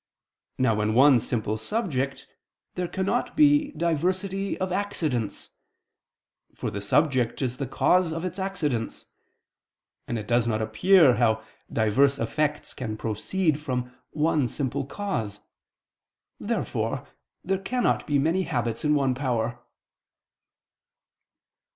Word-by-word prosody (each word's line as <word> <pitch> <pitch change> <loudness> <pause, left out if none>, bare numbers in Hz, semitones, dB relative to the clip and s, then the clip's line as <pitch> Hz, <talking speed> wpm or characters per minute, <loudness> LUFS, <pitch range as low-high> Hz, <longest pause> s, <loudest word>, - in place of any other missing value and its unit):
Now 115 -4 +2
in 110 +1 0
one 135 0 +7
simple 110 -2 -1
subject 140 - -2 0.5
there 180 -1 -2
cannot 195 +11 -1
be 295 -1 +5
diversity 185 +4 -1
of 185 0 -2
accidents; 160 - -2 1.0
for - - -4
the 100 - -4
subject 130 +2 +2
is 125 -1 -2
the 135 - -3
cause 175 +6 +2
of 165 +2 -3
its 185 +1 -4
accidents; 150 -12 -2 1.0
and 120 - -2
it 105 -1 -6
does 120 0 +2
not 110 -2 0
appear 130 - +5
how 110 -2 +2 0.3
diverse 135 +6 +3
effects 150 +5 -1
can 110 -4 -5
proceed 150 - -1
from 125 -4 -3 0.2
one 155 -3 +1
simple 135 +1 -3
cause. 115 - -4 1.0
Therefore - - -2 0.4
there 190 +1 0
cannot 245 +6 0
be 145 - +2
many 165 +7 +2
habits 120 -9 -2
in 150 0 +3
one 135 -3 +2
power. 120 -3 -1
140 Hz, 120 wpm, -26 LUFS, 120-180 Hz, 1.0 s, one